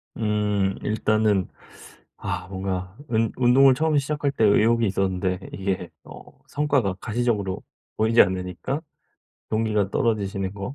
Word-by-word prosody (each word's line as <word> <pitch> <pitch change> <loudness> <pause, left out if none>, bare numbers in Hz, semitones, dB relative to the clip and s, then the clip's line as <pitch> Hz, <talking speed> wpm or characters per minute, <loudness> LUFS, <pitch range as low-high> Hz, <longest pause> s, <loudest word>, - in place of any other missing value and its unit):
음 105 -3 0
일단은 105 -2 +1 0.7
아 90 - -4
뭔가 95 0 -4 0.2
은 110 0 +1
운동을 130 +2 +5
처음에 155 +1 +1
시작할 145 0 -1
때 115 - +1
의욕이 115 +2 +4
있었는데 95 -1 -1
이게 95 -3 -3
어 - - -11 0.2
성과가 140 -10 0
가시적으로 110 -5 -1 0.3
보이지 110 +2 +3
않으니까 90 - -3 0.7
동기가 110 -3 0
떨어지시는 100 -5 -1
거. 100 +7 -6
105 Hz, 290 characters per minute, -24 LUFS, 95-115 Hz, 0.7 s, 운동을